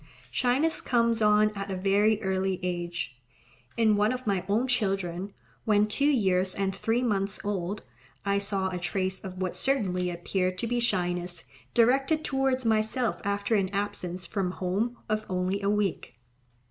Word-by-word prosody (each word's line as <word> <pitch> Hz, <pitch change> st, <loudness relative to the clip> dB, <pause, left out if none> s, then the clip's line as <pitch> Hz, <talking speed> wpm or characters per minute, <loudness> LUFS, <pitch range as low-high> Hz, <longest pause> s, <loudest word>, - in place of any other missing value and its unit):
Shyness 255 Hz, -, +1 dB
comes 230 Hz, -2 st, +2 dB
on 210 Hz, 0 st, +5 dB
at 200 Hz, 0 st, -5 dB
a 190 Hz, -, -2 dB
very 200 Hz, +3 st, +3 dB
early 190 Hz, -1 st, 0 dB
age. 175 Hz, -7 st, -3 dB, 0.6 s
In 220 Hz, -2 st, +4 dB
one 210 Hz, +2 st, +3 dB
of 255 Hz, 0 st, -4 dB
my 195 Hz, -4 st, 0 dB
own 225 Hz, +6 st, +2 dB
children, 195 Hz, -5 st, -1 dB, 0.3 s
when 210 Hz, -1 st, +4 dB
two 280 Hz, +7 st, +2 dB
years 190 Hz, -8 st, +2 dB
and 195 Hz, -1 st, -1 dB
three 225 Hz, +5 st, 0 dB
months 200 Hz, -4 st, 0 dB
old, 200 Hz, 0 st, -2 dB, 0.4 s
I 200 Hz, 0 st, +2 dB
saw 195 Hz, -1 st, 0 dB
a 180 Hz, -1 st, -4 dB
trace 190 Hz, +1 st, -2 dB
of 185 Hz, -1 st, -7 dB
what 185 Hz, -1 st, -2 dB
certainly 185 Hz, -6 st, +1 dB
appeared 185 Hz, +1 st, -1 dB
to 230 Hz, -, -2 dB
be 240 Hz, +1 st, 0 dB
shyness, 180 Hz, -6 st, -1 dB, 0.3 s
directed 270 Hz, +6 st, +3 dB
towards 265 Hz, -2 st, 0 dB
myself 220 Hz, +2 st, +1 dB
after 200 Hz, +2 st, -1 dB
an 195 Hz, -3 st, +2 dB
absence 180 Hz, -3 st, -3 dB
from 185 Hz, -1 st, -2 dB
home 205 Hz, +7 st, -1 dB
of 215 Hz, 0 st, 0 dB
only 185 Hz, +2 st, -1 dB
a 200 Hz, -, +1 dB
week. 200 Hz, -11 st, -1 dB
200 Hz, 160 wpm, -28 LUFS, 185-225 Hz, 0.6 s, on